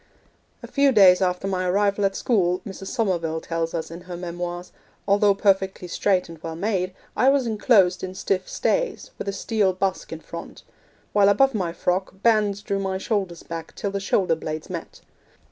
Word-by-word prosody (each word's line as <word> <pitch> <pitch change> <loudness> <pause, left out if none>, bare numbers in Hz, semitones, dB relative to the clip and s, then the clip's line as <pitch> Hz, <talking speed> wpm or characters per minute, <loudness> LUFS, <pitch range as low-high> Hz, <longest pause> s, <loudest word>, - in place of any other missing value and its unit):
'A - - -6
few 280 -1 +3
days 190 -6 +6
after 180 +1 0
my 185 -1 -1
arrival 200 +2 +1
at 195 0 +1
school,' 185 -6 +1
Mrs. 195 -2 -8
Somerville 170 -8 -1
tells 165 0 -3
us 160 -1 -4
in 170 +1 -8
her 175 - -5
memoirs, 175 0 -5 0.4
'although 200 0 +4
perfectly 190 -2 +1
straight 185 +1 +1
and 165 -2 -12
well 165 -1 -5
made, 185 0 -1 0.2
I 260 - +4
was 275 -2 +3
enclosed 205 -5 +3
in 185 0 -5
stiff 190 -1 -1
stays, - - -1
with - - -5
a - - +1
steel 200 -1 0
busk 190 0 -2
in 160 - -5
front; 170 +1 -9 0.5
while 205 -1 +5
above 270 +7 +4
my 185 -6 -1
frock, 185 +2 -2
bands 210 -3 +2
drew 200 -1 -1
my 190 -1 -2
shoulders 190 -4 -2
back 165 -1 -7
till 200 - -3
the 200 - -2
shoulder 190 -3 +1
blades 155 -1 -5
met. - - -7
190 Hz, 180 wpm, -24 LUFS, 175-205 Hz, 0.5 s, days